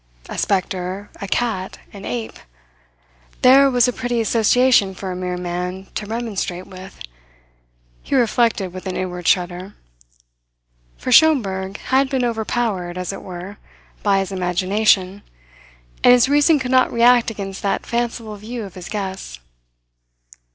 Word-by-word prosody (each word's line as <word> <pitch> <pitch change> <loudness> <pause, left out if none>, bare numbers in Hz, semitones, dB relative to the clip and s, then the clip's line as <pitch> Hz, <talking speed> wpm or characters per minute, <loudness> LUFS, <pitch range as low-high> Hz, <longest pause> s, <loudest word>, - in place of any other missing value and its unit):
A - - -7
spectre, 190 0 -2
a 200 - -4
cat, 205 -3 -2 0.2
an 200 -1 -9
ape 115 -3 -5 1.0
there 275 +2 +7
was 245 -1 +3
a 250 - 0
pretty 245 -1 -2
association 230 -2 +3
for 190 0 -5
a - - -4
mere 180 0 -3
man 180 +2 -4
to 210 - -5
remonstrate 205 -5 -3
with, 190 0 -12 1.0
he - - -2
reflected 230 -6 +1
with 185 +1 -7
an 185 - -3
inward 180 -2 -4
shudder; 180 +2 0 1.2
for 255 - -4
Schomberg 200 -10 +3
had 265 +1 +1
been 260 -2 0
overpowered, 220 -6 -2
as 180 +2 -3
it - - -8
were, 185 +2 -8 0.4
by 200 -1 +2
his 195 0 -2
imagination, 190 +2 +1 0.8
and 245 - +8
his 245 0 +5
reason 295 +3 +4
could 260 -2 -3
not 255 0 +4
react 240 0 +4
against 195 -3 -6
that 200 - -1
fanciful 235 -2 -3
view 225 +3 -6
of 195 -3 -9
his 180 -2 -9
guests. 190 - -5
200 Hz, 140 wpm, -20 LUFS, 185-240 Hz, 1.2 s, and